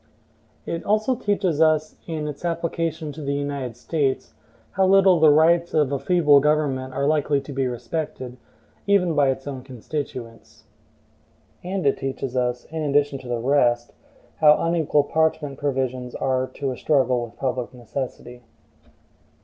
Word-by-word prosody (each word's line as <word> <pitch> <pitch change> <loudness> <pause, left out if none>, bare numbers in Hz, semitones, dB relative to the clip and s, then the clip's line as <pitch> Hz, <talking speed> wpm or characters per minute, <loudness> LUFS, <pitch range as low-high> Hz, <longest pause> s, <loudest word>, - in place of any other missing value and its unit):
It 165 - -4
also 215 +4 +1
teaches 195 - 0
us, 155 -1 +2
in 155 -2 -3
its 150 +2 -7
application 165 -2 -2
to 155 - -9
the 140 -1 -2
United 140 -4 -4
States, 140 0 -2 0.4
how 190 0 +2
little 190 -2 +5
the 155 -1 +6
rights 165 +3 +4
of 150 -3 +2
a 140 - -1
feeble 155 -5 +4
government 140 -3 0
are 140 - 0
likely 145 -1 +2
to 140 +1 -9
be 135 -1 0
respected, 125 +1 -5 0.5
even 190 -4 +3
by 145 -2 +3
its 135 0 -3
own 135 -2 -5
constituents. 125 -2 -7 1.0
And 185 -1 -3
it 140 - +2
teaches 135 -1 -4
us, 125 -1 -1
in 160 -1 -3
addition 145 -1 +1
to 130 - -12
the 120 -1 -1
rest, 120 -1 +1 0.4
how 150 -1 +6
unequal 165 -3 +2
parchment 155 -2 0
provisions 130 -3 -2
are 130 -1 0
to 140 -2 -2
a 125 - -6
struggle 130 -5 +2
with 115 - -10
public 130 -2 -2
necessity. 125 0 -7
145 Hz, 150 wpm, -23 LUFS, 130-160 Hz, 1.0 s, the